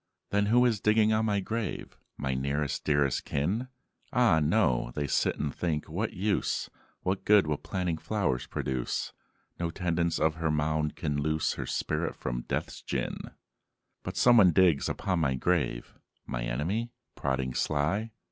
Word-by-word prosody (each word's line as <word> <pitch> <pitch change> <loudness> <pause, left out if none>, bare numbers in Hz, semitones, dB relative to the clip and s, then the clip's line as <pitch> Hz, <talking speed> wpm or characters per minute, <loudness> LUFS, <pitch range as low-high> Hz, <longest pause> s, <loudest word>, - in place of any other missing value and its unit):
'" - - -57
"Then 100 0 +2
who 120 +3 +5
is 115 -4 +2
digging 110 0 +4
on 110 +1 +2
my 100 -2 +1
grave, 110 +2 -4 0.2
My 70 -2 -1
nearest 70 +2 -1
dearest 70 -3 +1
kin?" 95 - -1 0.4
"Ah, 120 -10 +4
no: 75 - +2
they 75 - -1
sit 70 - +1
and 75 -2 -2
think, 80 -4 -2
'What 95 +8 -2
use! 100 +2 -1 0.3
What 95 +1 -1
good 105 -3 +5
will 75 -1 -1
planting 90 -4 -2
flowers 100 -14 -1
produce? 65 -2 -2 0.5
No 85 -1 -1
tendance 85 -1 0
of 80 0 +2
her 80 -1 0
mound 75 0 0
can 75 -3 -2
loose 80 +1 0
Her - - -5
spirit - - -1
from - - -4
Death's - - -3
gin.'" - - -3 0.7
"But - - -6
someone 115 -6 +7
digs 85 -5 +4
upon 95 -3 -1
my 70 -5 +1
grave? 70 -4 -1 0.3
My - - -3
enemy? 85 - -1 0.2
prodding 65 -2 -2
sly?" 80 - 0
80 Hz, 155 wpm, -29 LUFS, 70-100 Hz, 0.7 s, someone